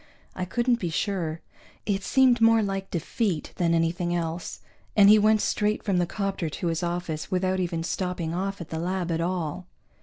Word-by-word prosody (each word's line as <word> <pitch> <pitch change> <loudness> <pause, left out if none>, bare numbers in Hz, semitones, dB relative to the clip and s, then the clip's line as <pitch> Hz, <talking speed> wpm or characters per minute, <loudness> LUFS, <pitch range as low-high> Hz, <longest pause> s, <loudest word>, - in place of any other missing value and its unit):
I 185 - -2
couldn't 240 +5 +1
be 175 - -2
sure. 165 -2 -2 0.4
It 200 -1 0
seemed 255 0 +4
more 225 -1 +5
like 195 -1 -3
defeat 175 0 -2
than 170 -1 +2
anything 170 +1 0
else, 170 0 -4 0.3
and 200 -1 +7
he 215 +1 +8
went 215 0 +4
straight 210 0 0
from 195 -3 +1
the 175 - +1
'copter 195 -4 -2
to 170 - -4
his 165 +1 -1
office 175 -3 -3
without 185 0 0
even 170 -2 -2
stopping 175 -2 -2
off 195 +3 -2
at 170 - -8
the 160 - -4
lab 180 0 -2
at 165 0 0
all. 180 0 -3
180 Hz, 185 wpm, -26 LUFS, 170-200 Hz, 0.4 s, he